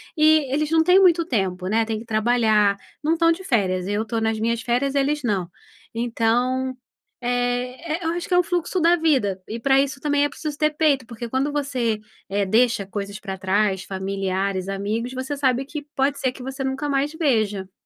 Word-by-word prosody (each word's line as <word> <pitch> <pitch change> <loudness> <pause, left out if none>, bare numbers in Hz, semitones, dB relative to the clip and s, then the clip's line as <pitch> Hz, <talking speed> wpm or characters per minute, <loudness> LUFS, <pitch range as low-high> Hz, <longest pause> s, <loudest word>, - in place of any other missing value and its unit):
e 310 -3 +4
eles 305 +2 0
não 325 0 +5
têm 360 +3 +5
muito 345 -3 +4
tempo, 190 - -1
né, 225 +3 +2
têm 220 -1 -3
que 230 - -10
trabalhar, 215 -2 +2 0.3
não 315 - +2
estão 330 0 +3
de 380 +3 -9
férias, 185 - 0
eu 205 +2 0
estou 225 +1 -3
nas 220 -1 0
minhas 230 +1 0
férias 260 +3 0
eles 285 +1 +1
não. 195 -7 -1 0.4
Então, 245 +3 0 0.5
eh, 245 +5 -1
e - - -9
eu - - +1
acho 345 0 -4
que 365 - -2
é 355 - +6
um - - +3
fluxo 350 +1 -1
da 340 +1 +5
vida, 265 - +1
e 230 +2 -5
para 270 +3 +3
isso 275 -1 -1
também 290 -1 +2
é - - -1
preciso 295 0 -6
ter 305 0 +2
peito, 295 -5 +2
porque 235 0 -7
quando 265 +4 0
você, 255 -7 -1 0.3
eh, 200 +1 0
deixa 225 0 +2
coisas 200 0 -5
para 195 -1 -6
trás, 195 0 +1
familiares, 190 0 -2
amigos, 210 +5 -3
você 260 +2 -4
sabe 260 -2 +1
que 290 0 -6
pode 275 +1 +1
ser 260 -2 0
que 255 - -12
você 270 +1 -5
nunca 270 +2 -2
mais 280 +2 0
veja. 215 - 0
245 Hz, 200 wpm, -23 LUFS, 210-290 Hz, 0.5 s, é